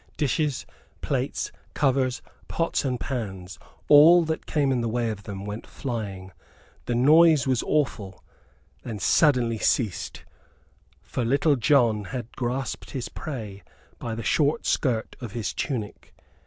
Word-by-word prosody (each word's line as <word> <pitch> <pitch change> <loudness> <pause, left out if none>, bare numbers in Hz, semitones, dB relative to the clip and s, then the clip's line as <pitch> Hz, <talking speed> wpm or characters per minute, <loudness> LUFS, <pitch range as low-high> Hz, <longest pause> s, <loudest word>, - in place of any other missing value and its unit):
Dishes, 145 0 0 0.4
plates, - - -2 0.2
covers, 130 -2 +1 0.2
pots 165 0 -1
and 130 -3 -1
pans 95 -8 -5 0.3
all 160 +4 +8
that 160 0 -3
came 145 -3 +1
in 125 -2 +1
the 115 - -1
way 115 0 -1
of 105 -2 -7
them 100 0 -7
went 105 +2 -6
flying. 100 -7 -5 0.5
The 120 - -1
noise 155 +3 +5
was 130 -3 +1
awful; 120 -10 -2 0.6
then 115 -3 -6
suddenly 120 - +3
ceased 105 -5 -1 0.8
for 125 - -3
Little 140 +5 +3
John 120 -5 +3
had 120 +2 -6
grasped 125 +1 -3
his 130 -3 -5
prey 110 -9 -7 0.4
by 115 -2 -4
the 115 - -5
short 150 +4 +1
skirt 120 -5 0
of 115 -5 -7
his 115 -3 -3
tunic. 115 -8 -5
125 Hz, 135 wpm, -25 LUFS, 110-140 Hz, 0.8 s, all